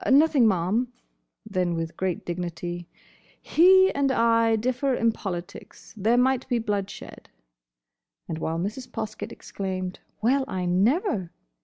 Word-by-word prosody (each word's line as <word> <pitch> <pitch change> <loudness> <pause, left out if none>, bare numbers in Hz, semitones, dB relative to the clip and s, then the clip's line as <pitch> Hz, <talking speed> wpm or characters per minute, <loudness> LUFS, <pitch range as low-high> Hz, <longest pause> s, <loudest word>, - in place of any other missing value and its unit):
"Nothing, 280 -3 +5
ma'am." 205 +6 +1 0.5
Then 185 -5 -1
with 165 0 -4
great 185 -1 -2
dignity, 175 0 -4 0.5
"He 375 +3 +5
and 280 -1 +1
I 230 -2 +3
differ 255 +4 0
in 230 -1 +2
politics. 185 -3 -7
There 220 +3 +2
might 260 +1 +2
be 245 - +2
bloodshed." 205 -3 -4 1.0
And 160 - -4
while 160 +1 -2
Mrs. 215 +8 -4
Poskett 215 -2 -5
exclaimed 185 -2 -5 0.2
"Well, 265 +5 +2
I 185 -1 -3
never!" 200 - +1
215 Hz, 125 wpm, -25 LUFS, 180-255 Hz, 1.0 s, Nothing